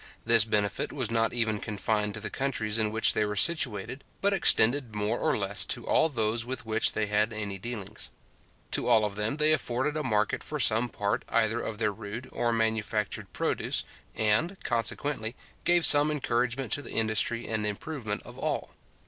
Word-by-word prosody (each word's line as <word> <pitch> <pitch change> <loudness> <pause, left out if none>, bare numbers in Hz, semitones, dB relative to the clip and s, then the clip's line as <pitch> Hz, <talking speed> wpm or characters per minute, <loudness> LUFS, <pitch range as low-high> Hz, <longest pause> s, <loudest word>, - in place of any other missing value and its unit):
This 115 -2 +5
benefit 105 -2 0
was 130 -6 -3
not 115 -1 +1
even 110 -3 0
confined 105 0 -2
to - - -6
the 110 - -6
countries 115 -5 -1
in 110 -1 +2
which 110 +1 +4
they 110 - +1
were 105 0 -3
situated, 130 - +2 0.2
but 200 0 +1
extended 130 - +3
more 105 +3 -1
or - - +1
less 100 0 +2
to 120 - 0
all 160 - +2
those 115 -3 -1
with 125 0 -4
which 110 0 +2
they 110 - 0
had 105 +2 +1
any 105 -3 -4
dealings. 110 -1 -6 0.6
To - - -1
all 115 -3 +4
of 105 - -3
them 105 +7 -2
they 155 +1 +5
afforded 135 0 -1
a 155 - -1
market 105 -4 0
for 150 - -5
some 115 0 +4
part 100 -2 -2
either 115 0 +1
of 110 - -5
their 110 -1 0
rude 110 +4 -8
or 120 - -1
manufactured 110 -2 -2
produce, - - -1 0.3
and, 110 - +1
consequently, 120 0 -2 0.3
gave 175 -2 +4
some 145 +1 +7
encouragement 125 -4 -1
to 145 - +1
the - - -8
industry 110 +1 +1
and 110 -1 -2
improvement 105 +1 -4
of - - -12
all. - - -2
110 Hz, 180 wpm, -28 LUFS, 105-125 Hz, 0.6 s, some